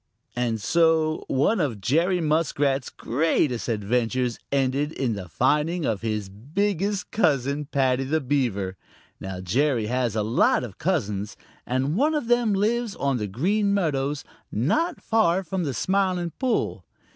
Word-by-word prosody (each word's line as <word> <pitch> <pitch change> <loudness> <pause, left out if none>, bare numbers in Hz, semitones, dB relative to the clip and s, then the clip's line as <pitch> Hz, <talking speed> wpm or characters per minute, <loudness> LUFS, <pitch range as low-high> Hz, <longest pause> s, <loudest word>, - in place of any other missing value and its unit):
And 120 -2 0
so 160 +4 +2
one 145 +11 +2
of 135 - -1
Jerry 170 - +2
Muskrat's 145 -4 +1
greatest 130 -2 0
adventures 120 +3 0
ended 140 +2 +1
in 125 -4 -1
the 95 -4 -6
finding 150 - +1
of 110 -5 -1
his 110 -3 -2
biggest 195 - -2
cousin, 140 - +1
Paddy 135 -2 +1
the 155 +4 +1
Beaver. 120 -10 -1 0.4
Now 95 -1 -6
Jerry 120 +5 +1
has 120 -1 -1
a 110 - +1
lot 115 +3 +2
of 110 -6 -8
cousins, 105 - -1 0.3
and 130 +5 0
one 300 +8 +2
of 250 -6 -2
them 240 -3 +3
lives 220 +2 0
on 140 -2 0
the 105 -3 -3
Green 200 - +1
Meadows 145 -6 -1 0.3
not 315 - 0
far 195 -5 +2
from 180 0 -2
the 140 - -2
Smiling 185 -3 0
Pool. 255 +2 -1
140 Hz, 145 wpm, -25 LUFS, 120-180 Hz, 0.4 s, them